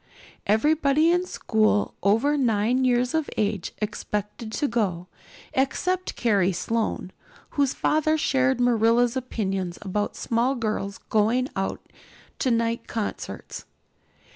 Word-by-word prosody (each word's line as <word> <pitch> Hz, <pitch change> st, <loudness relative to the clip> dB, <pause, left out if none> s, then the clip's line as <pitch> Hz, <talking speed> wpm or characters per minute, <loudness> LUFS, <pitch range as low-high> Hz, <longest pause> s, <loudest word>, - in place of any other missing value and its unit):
Everybody 295 Hz, +7 st, +3 dB
in 355 Hz, +1 st, +1 dB
school 215 Hz, -, +1 dB
over 225 Hz, +9 st, +3 dB
nine 245 Hz, -1 st, +2 dB
years 245 Hz, 0 st, +2 dB
of 320 Hz, -2 st, 0 dB
age 205 Hz, -3 st, -1 dB
expected 210 Hz, +1 st, -4 dB
to 290 Hz, -, 0 dB
go, 195 Hz, -8 st, -1 dB, 0.5 s
except 365 Hz, +7 st, 0 dB
Carrie 200 Hz, -6 st, +2 dB
Sloane, 215 Hz, 0 st, -2 dB, 0.4 s
whose 280 Hz, -2 st, +1 dB
father 310 Hz, +1 st, +2 dB
shared 265 Hz, -3 st, +2 dB
Marilla's 240 Hz, 0 st, +3 dB
opinions 195 Hz, -8 st, -2 dB
about 205 Hz, +1 st, -2 dB
small 240 Hz, +4 st, 0 dB
girls 215 Hz, -4 st, -2 dB
going 230 Hz, +5 st, +2 dB
out 195 Hz, 0 st, -3 dB, 0.5 s
to 260 Hz, -, +1 dB
night 230 Hz, 0 st, 0 dB
concerts. 220 Hz, -3 st, -5 dB
230 Hz, 115 wpm, -25 LUFS, 210-265 Hz, 0.5 s, Everybody